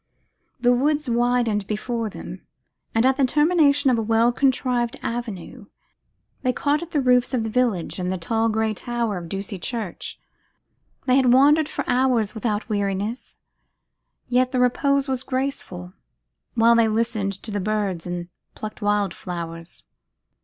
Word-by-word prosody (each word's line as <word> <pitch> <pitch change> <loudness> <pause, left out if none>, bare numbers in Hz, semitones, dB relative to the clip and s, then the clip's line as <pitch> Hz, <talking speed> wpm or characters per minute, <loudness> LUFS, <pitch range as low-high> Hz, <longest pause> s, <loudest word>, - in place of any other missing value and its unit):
The 245 0 +4
woods 295 +3 +1
widened 235 -4 +1
before 225 +1 -2
them, - - -9 0.5
and 225 +2 +3
at 265 0 +3
the 280 - +2
termination 295 -1 +3
of 235 - +2
a - - +1
well 225 +2 +3
contrived 250 -2 +1
avenue, 230 -1 -5 0.7
they 255 - +2
caught 300 +6 0
the 300 - 0
roofs 250 0 +3
of 235 - 0
the 220 - -3
village 220 -9 0
and 180 0 -2
the 190 - -1
tall 225 +6 0
grey 220 0 0
tower 230 -3 -2
of 170 -1 -9
Ducie 195 0 -5
Church. 220 -2 -5 0.9
They 255 0 +4
had 255 -2 +4
wandered 290 +4 +5
for 280 - -4
hours 245 -4 +2
without 220 -1 -2
weariness, 205 +2 -2 0.9
yet 250 +1 +2
the 255 - 0
repose 275 +3 +2
was 260 -2 -1
grateful, 255 -10 -4 0.6
while 230 0 +5
they 230 -1 +4
listened 215 -2 0
to 205 +3 -9
the 205 - -1
birds, 195 -4 -2
and 175 0 -4 0.3
plucked 215 0 -7
wildflowers. 175 -5 -3
235 Hz, 145 wpm, -23 LUFS, 205-255 Hz, 0.9 s, wandered